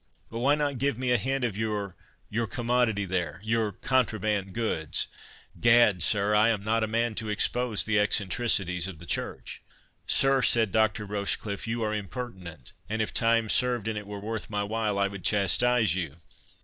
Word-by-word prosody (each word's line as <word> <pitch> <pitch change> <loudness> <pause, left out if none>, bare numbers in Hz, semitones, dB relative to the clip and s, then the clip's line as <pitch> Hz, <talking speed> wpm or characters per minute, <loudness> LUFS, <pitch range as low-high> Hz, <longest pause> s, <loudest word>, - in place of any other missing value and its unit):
But 115 - -5
why 140 +4 +3
not 145 -3 -2
give 140 -2 0
me 125 -1 -1
a 125 - +4
hint 135 +3 -2
of 115 -5 -1
your—your 105 +1 -4
commodity 120 -3 0
there—your 95 +5 -1
contraband 105 -4 0
goods? 80 -9 -1 0.5
Gad, 115 -6 +5
sir, 105 +3 +2
I 105 +2 +5
am 105 -3 -1
not 110 +1 +1
a - - 0
man 115 +1 0
to 110 0 -4
expose 115 +1 +1
the 110 -1 +2
eccentricities 100 -3 +1
of 95 -5 -8
the 85 - -12
Church." - - -5 0.5
"Sir," 135 0 +3
said 115 -4 +3
Dr. 110 0 +1
Rochecliffe, 100 +1 -2
"you 115 0 -2
are 105 0 -1
impertinent; 95 - -7 0.2
and 110 +1 -2
if 110 - -1
time 115 -1 +2
served, 120 -1 +2
and 110 - -2
it 105 -1 -6
were 105 0 -6
worth 110 +1 -5
my 105 -1 -1
while, 105 -1 -1
I 100 0 +2
would 100 -2 -8
chastise 105 +1 +3
you." 85 -6 -3
110 Hz, 175 wpm, -27 LUFS, 100-120 Hz, 0.5 s, Gad